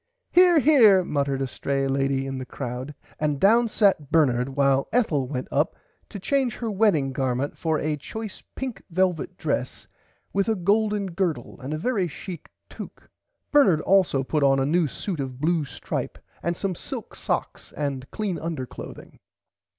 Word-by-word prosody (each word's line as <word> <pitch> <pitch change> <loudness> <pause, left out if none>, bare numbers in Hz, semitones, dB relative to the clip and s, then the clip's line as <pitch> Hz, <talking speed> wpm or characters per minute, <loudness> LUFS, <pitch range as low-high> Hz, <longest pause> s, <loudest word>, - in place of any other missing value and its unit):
Here 355 -1 +6
Here 240 -11 +6
muttered 140 -4 -1
a - - -1
stray 135 +2 -1
lady 135 0 0
in 135 -1 -4
the - - -4
crowd 125 +4 -5 0.2
and 150 -2 0
down 230 +6 +5
sat 195 -10 +2
Bernard 130 -5 +3
while 140 -1 +3
Ethel 165 - +1
went 130 -1 -4
up 145 +4 +1 0.3
to 205 - -7
change 260 +4 0
her 230 -2 -3
wedding 185 -10 +2
garment 130 +1 -1
for 160 -2 0
a 150 0 -1
choice 220 +8 -7
pink 260 -3 -5
velvit 180 -3 0
dress - - -2 0.5
with 195 +2 +1
a 220 - +2
golden 210 +2 +1
gurdle 170 -2 -2
and 130 +3 -5
a 155 - -1
very 195 0 0
chick 170 +3 -8 0.2
tocque. - - -11 0.4
Bernard 200 - +5
[Pg - - -11
101] - - +2
also 170 -8 +3
put 150 +3 -1
on 135 -1 +4
a 135 - +1
new 165 +3 +2
suit 170 +4 -4
of 130 -2 -4
blue 160 0 +1
stripe 125 -4 -5 0.2
and 170 +1 -1
some 195 -2 -1
silk - - -7
socks - - -3
and 140 -3 -3
clean 205 -5 -3
under 160 -5 -3
clothing. - - -11
160 Hz, 175 wpm, -25 LUFS, 135-200 Hz, 0.5 s, Here